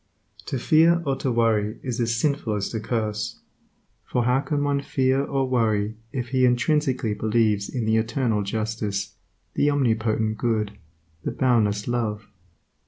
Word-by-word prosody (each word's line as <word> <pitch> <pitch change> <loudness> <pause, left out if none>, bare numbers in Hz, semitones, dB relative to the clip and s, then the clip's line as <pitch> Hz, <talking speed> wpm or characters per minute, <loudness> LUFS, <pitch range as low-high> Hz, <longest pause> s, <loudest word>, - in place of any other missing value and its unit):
To 135 - -2
fear 160 +6 +4
or 135 -1 +1
to 130 - -1
worry 110 -2 +1
is 125 -2 -3
as 115 0 +1
sinful 140 -4 0
as 100 -1 -2
to 110 - -3
curse, 110 -1 -2 0.6
for 125 - -1
how 125 +2 +3
can 145 +1 -1
one 140 -1 +1
fear 135 0 +1
or 135 -2 -1
worry 110 -4 +1 0.2
if 125 -2 -4
he 130 0 +1
intrinsically 125 -1 +2
believes 110 -2 +1
in 120 -4 -2
the 110 0 +2
Eternal 115 -1 0
justice, 105 -1 -3 0.4
the 145 - +2
Omnipotent 110 -5 +1
Good, 110 -3 0 0.5
the - - -1
Boundless 105 -5 +1
Love? 110 -3 -2
115 Hz, 150 wpm, -24 LUFS, 110-130 Hz, 0.6 s, fear